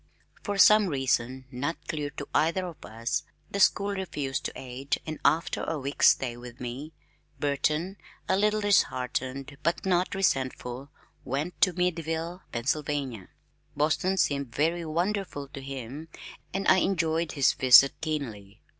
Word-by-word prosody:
For 205 -1 -3
some 210 +2 +7
reason 130 -3 0
not 140 +6 -2
clear 150 -3 -2
to 145 - -5
either 170 +4 +2
of 175 -3 -9
us, 115 +3 -2 0.3
the 200 - -2
school 200 +1 +4
refused 150 -9 -3
to - - -1
aid 130 +2 -3
and 155 -1 -5
after 160 +2 +2
a 165 - -2
week's 140 0 +2
stay 125 -3 +1
with 120 0 -11
me 125 +5 -6 0.5
Burton, 150 +6 0 0.3
a 190 - +3
little 210 +2 +2
disheartened 135 -7 0
but 170 +4 0
not 185 +1 +1
resentful, 130 -7 -1 0.3
went 145 +7 -3
to 185 - +5
Meadville, 170 0 -2
Pennsylvania. 135 -3 -2 0.5
Boston 160 +6 +1
seemed 140 -5 +1
very 165 +4 +1
wonderful 175 -2 -2
to 135 - -8
him 135 +3 -7 0.4
and 195 +2 -2
I - - +7
enjoyed 165 -3 +1
his 140 -3 +3
visit 130 +1 +7
keenly. 120 -11 -4
150 Hz, 140 wpm, -28 LUFS, 130-175 Hz, 0.5 s, some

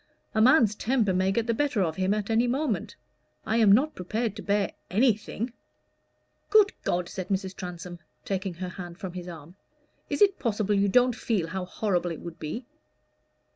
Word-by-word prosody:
"A 220 - +2
man's 240 -3 +6
temper 220 -3 +1
may 185 +1 +2
get 225 +3 0
the 230 - +1
better 245 -5 +1
of 160 -2 -2
him 190 +1 +1
at 210 +1 -1
any 230 +2 +3
moment. 250 - -1 0.5
I 220 - +1
am 220 -3 +6
not 270 +9 +4
prepared 215 +4 -2
to 210 - -7
bear 200 0 0 0.2
anything." 225 +2 +1 1.0
"Good 425 -2 +5
God!" 175 0 -1
said 185 0 -6
Mrs. 190 -1 -2
Transome, 175 -1 -7 0.3
taking 190 -2 -2
her 180 +1 -5
hand 175 -2 -8
from 190 -2 -6
his 180 -1 -7
arm, 170 +1 -10 0.5
"is 285 +6 +3
it 395 -2 +3
possible 210 -3 0
you 200 0 +3
don't 250 +2 +4
feel 200 -10 -1
how 185 +1 -3
horrible 180 -2 -1
it 165 - -6
would 170 -1 -8
be?" 225 - -5
200 Hz, 180 wpm, -27 LUFS, 180-230 Hz, 1.0 s, man's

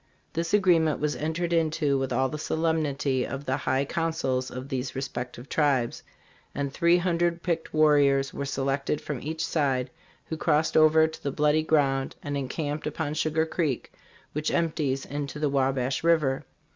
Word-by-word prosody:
This 165 0 -2
agreement 175 -7 +3
was 150 0 0
entered 165 +3 -2
into 160 -3 +1
with 135 -1 -1
all 130 +2 +2
the 150 +3 -5
solemnity 150 -5 0
of 135 +2 -5
the 130 - 0
high 135 0 0
councils 135 -5 -1
of 130 +1 -7
these 130 0 -3
respective 125 -1 -5
tribes, 140 -7 +1 0.5
and 140 -1 -2
three 170 +3 +4
hun 175 -1 0
dred 170 0 0
picked 165 -2 -2
warriors 145 -3 +4
were 140 - -3
selected 135 +1 -1
from 145 -5 -5
each 160 +2 -3
side, 135 -5 0 0.3
who 160 - -5
crossed 155 0 +1
over 155 0 +6
to 160 0 -6
the 140 - -2
bloody 150 +2 +2
ground 140 -4 +1
and 145 0 -3
encamped 145 +3 -3
upon 150 0 -3
Sugar 155 +1 +1
Creek, 160 -6 -2 0.4
which 150 +1 -1
empties 150 -5 0
into 145 0 -5
the 150 -1 0
Wa 135 -1 +2
bash 130 +2 -2
river. 155 -6 +2
150 Hz, 170 wpm, -27 LUFS, 135-160 Hz, 0.5 s, over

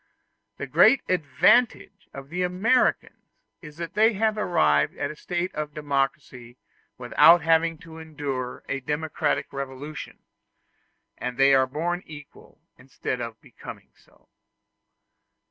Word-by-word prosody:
The - - -5
great 245 +5 +4
advantage 195 +5 +1
of 135 0 -10
the 180 +3 -3
Americans 185 +8 0 0.3
is 150 -2 -12
that 170 -1 -6
they 220 +2 +4
have 215 +1 0
arrived 75 - +1
at 140 - -3
a - - -10
state 175 +3 -4
of 150 -1 -5
democracy 135 -4 -3 0.4
without 155 +7 +5
having 165 0 +2
to 160 -1 -11
endure 145 -5 -5
a 135 - -2
democratic 150 +3 -2
revolution; 140 +2 -7 1.0
and 125 0 -5
that - - -15
they 135 0 +6
are 130 -1 +4
born 170 +6 -3
equal, 145 -2 -14 0.2
instead 130 -1 -5
of 115 -1 -7
becoming - - -12
so. - - -28
150 Hz, 130 wpm, -25 LUFS, 135-175 Hz, 1.0 s, they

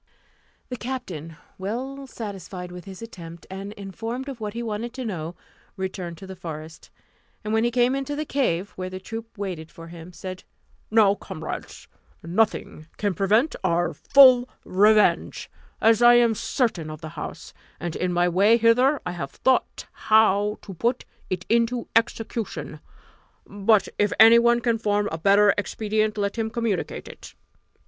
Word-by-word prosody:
The 250 - -4
captain, 190 - -6 0.2
well 260 +8 -5
satisfied 190 -6 -7
with 180 +1 -9
his 195 +2 -9
attempt, 170 -6 -10
and 195 +1 -6
informed 225 +7 -6
of 265 -3 -7
what 210 0 -5
he 235 - -3
wanted 230 +2 -4
to 260 -1 -5
know, 175 -5 -4 0.4
returned 185 -3 -5
to 190 - -10
the 190 0 -8
forest; 160 -3 -9 0.5
and 215 +1 -3
when 220 0 +3
he 240 - +2
came 245 +1 +2
into 275 +1 -3
the 305 +1 -3
cave, 205 - -1
where 185 0 -6
the 185 0 -7
troop 225 +3 -8
waited 180 -6 -5
for 165 0 -12
him, 170 +1 -10
said, 185 +1 -8 0.5
"Now, 215 -2 +5
comrades, 180 -5 -7 0.4
nothing 170 -3 -1
can 205 -2 0
prevent 215 - +2
our 175 -1 +1
full 255 -3 +6 0.2
revenge, 210 +3 +3 0.3
as 225 +1 +4
I 240 0 +8
am 235 -1 +4
certain 210 - -1
of 155 -1 -8
the 155 - -6
house; - - -8 0.3
and 170 -2 -4
in 180 0 -1
my 175 0 +2
way 200 +6 +4
hither 250 +5 +4
I 180 - -2
have 160 -6 -5
thought 260 -1 0
how 210 -1 +3
to 195 - -8
put 235 +8 -1 0.2
it 185 0 -3
into 235 +1 +1
execution, 230 -1 -1 0.7
but 205 0 +2
if 205 -1 +2
any 225 +1 +9
one 235 0 +3
can 230 -1 +1
form 205 -1 0
a 160 - -4
better 200 +3 +5
expedient, 215 +1 -1
let 200 +2 -2
him 220 0 -1
communicate 220 -5 -3
it." - - -12
210 Hz, 160 wpm, -24 LUFS, 185-230 Hz, 0.7 s, any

